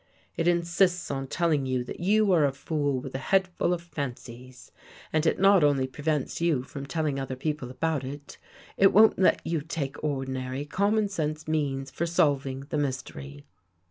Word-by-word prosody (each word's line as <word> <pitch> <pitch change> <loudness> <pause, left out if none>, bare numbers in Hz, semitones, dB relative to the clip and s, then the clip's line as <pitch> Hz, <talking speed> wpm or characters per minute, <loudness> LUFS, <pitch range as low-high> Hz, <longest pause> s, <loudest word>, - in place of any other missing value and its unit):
It 165 - 0
insists 175 0 +2
on 135 -1 -3
tell 170 +4 0
ing 140 -3 +1
you 130 -1 0
that - - -8
you 205 +3 +3
are 170 -4 +4
a 140 - +3
fool 145 -1 -1
with 130 +1 -8
a 135 - -3
head 190 +7 +2
full 175 -1 -1
of 175 -1 -2
fancies 130 -5 -8 0.4
and 155 +1 +2
it - - +1
not 195 -2 +6
only 140 -3 +3
prevents 150 +3 -2
you 160 -7 +2
from 140 +1 -8
telling 150 -2 -1
other 135 -1 -4
peo 150 +4 -1
ple 135 -4 -8
about 155 +2 -1
it, 140 +2 -8 0.4
it 195 0 +5
won't 220 +1 +6
let 190 - +3
you 165 -2 -1
take 145 -3 -5
ordinary, 130 -1 -3
common 205 +6 +1
sense 155 -5 -3
means 140 -4 -1
for 170 +5 -2
solving 140 -5 +1
the 150 - 0
mystery. 70 - -5
145 Hz, 185 wpm, -27 LUFS, 135-170 Hz, 0.4 s, not